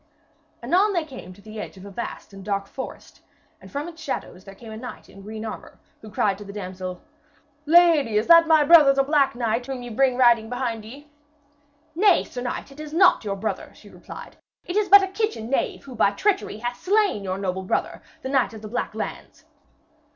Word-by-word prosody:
Anon 400 +4 +3
they 340 -4 0
came 255 - -10
to 200 +2 -16
the 215 0 -9
edge 200 - -9
of 190 - -12
a 200 - -9
vast 215 0 -7
and 195 0 -10
dark 200 0 -2
forest, 260 +6 -9 0.4
and - - -14
from 285 +3 -4
its 335 -1 -11
shadows 190 -10 -5
came 230 -2 -11
a 220 - -7
knight 250 +2 -9
in 195 - -14
green 215 +2 -7
armour, 220 - -8 0.2
who 215 - -11
cried 200 -1 0
to - - -8
the 200 - -9
damsel: 185 -2 -7 0.6
'Lady, 315 -9 +5
is 215 - +1
that 335 -1 +7
my 315 -2 +5
brother 295 -3 +7
the 275 0 +2
Black 280 -3 +2
Knight 240 +1 -1
whom 265 -2 -5
ye 245 - -7
bring 255 +2 +2
riding 235 -3 +4
behind 245 -3 -3
ye?' 275 +7 -12 0.9
'Nay, 380 +2 +4
sir 245 - -7
knight, 245 +2 -5
it 275 - -14
is 305 0 -8
not 365 -6 +5
your 200 -2 -2
brother,' 215 +3 -4
she - - -16
replied. - - -11 0.3
'It 355 - -5
is 420 -1 +1
but 400 +1 +9
a - - 0
kitchen 390 - -3
knave 275 - -1
who 270 - -10
by 220 - +3
treachery 390 - -1
hath 240 +2 -5
slain 390 - +1
your 185 -1 -3
noble 190 -1 -3
brother, 190 - -2 0.2
the 260 - -4
Knight 265 -4 +1
of 220 - -11
the - - -6
Black 245 +3 -4
Lands.' - - -7
245 Hz, 210 wpm, -24 LUFS, 210-315 Hz, 0.9 s, but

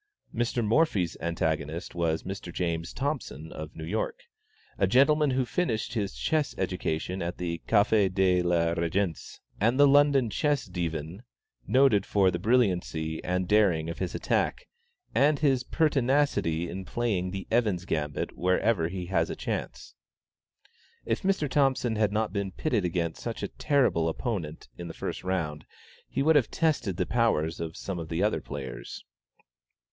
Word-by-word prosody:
Mr. 120 0 0
Morphy's 105 - +2
antagonist 80 -1 -2
was 85 -2 0
Mr. 95 -2 -6
James 85 -1 -2
Thompson, 130 - -4
of 80 0 -8
New 80 - -7
York, 105 +7 -3 0.6
a 95 - +3
gentleman 145 +7 +4
who 130 -1 +1
finished 120 -8 -1
his 100 - -2
chess 150 - 0
education 90 -1 -2
at 85 +1 -3
the 85 -2 -3
Café 105 -2 +3
de 95 -1 +3
la 85 -1 +2
Régence, 85 +1 -2 0.2
and 115 +6 +2
the 145 - +8
London 140 -4 +4
Chess 145 +2 0
Divan, 85 0 -4 0.5
noted 130 -7 +4
for 95 -2 +3
the 85 - -3
brilliancy 90 -8 +1
and 90 0 -1
daring 90 -6 +3
of - - -8
his 90 -2 -3
attack, - - -1 0.5
and 140 +5 +4
his 135 -4 +2
pertinacity 135 - +1
in 95 +2 -5
playing 100 -4 -1
the 95 0 -5
Evans' 105 -7 +1
Gambit 75 -4 -2
wherever 90 0 +1
he 90 +1 -5
has 85 -2 0
a - - -3
chance. - - -5 1.1
If 115 - -1
Mr. 190 -6 +1
Thompson 130 -4 +1
had 105 -2 +2
not 110 +1 -1
been 100 -2 -2
pitted 120 - 0
against 85 -2 -2
such - - -5
a - - -2
terrible 125 - +1
opponent, 85 - -4
in 85 - -5
the 80 - -8
first - - -5
round, 80 -5 -2 0.5
he 135 - -1
would 160 +2 +4
have 130 - +2
tested 150 - 0
the - - 0
powers 95 -10 +1
of 80 0 -5
some 95 -3 -4
of 80 -1 -6
the 85 +3 0
other 105 - +1
players. 65 -4 -7
95 Hz, 155 wpm, -28 LUFS, 85-120 Hz, 1.1 s, the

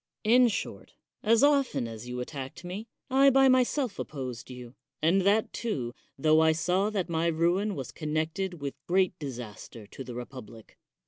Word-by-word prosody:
In 245 +3 +6
short, 220 - -5 0.3
as 225 +3 +4
often 280 - +3
as 115 +1 -8
you 125 0 -4
attacked 135 +4 -7
me, 190 +6 -6 0.2
I 270 +1 +6
by 270 0 +5
myself 255 -2 +2
opposed 130 -5 -6
you, 125 -1 -9 0.3
and 170 +5 +3
that, 205 +3 +2
too, 130 - -3 0.2
tho 155 +3 +4
I 160 0 +5
saw 180 +5 +1
that 200 -5 -2
my 165 -1 0
ruin 175 +5 +1
was 135 -5 -6
connected 160 +4 -2
with 140 0 -6
great 185 +1 +3
disaster 120 -5 -8
to 135 - -9
the 125 -2 -8
republic. 120 -3 -10
165 Hz, 165 wpm, -28 LUFS, 130-210 Hz, 0.3 s, In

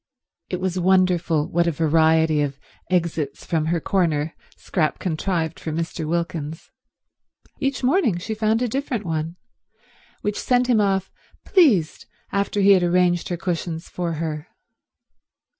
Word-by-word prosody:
It 180 - -2
was 185 -1 -1
wonderful 180 -4 +2
what 170 0 +1
a - - +3
variety 160 0 +3
of 140 -2 -2 0.3
exits 165 -5 -1
from 160 -2 0
her 170 +1 +1
corner 160 -4 0 0.2
Scrap 155 -5 -1
contrived 165 -1 -2
for 160 - -4
Mr. 165 0 -3
Wilkins. 165 -2 -3 0.9
Each 275 -1 -1
morning 255 - +2
she 220 +6 -4
found 220 +2 +1
a - - +1
different 245 -3 -3
one, 160 0 -2 0.9
which 210 0 -2
sent 250 0 +2
him 240 -4 +3
off 195 -2 0 0.3
pleased 245 - +3 0.2
after 200 +1 0
he 200 +1 +6
had 190 -2 +6
arranged 175 0 +2
her 175 - -2
cushions 170 -1 -3
for 175 -2 -3
her. 155 0 -4
175 Hz, 140 wpm, -23 LUFS, 160-195 Hz, 0.9 s, he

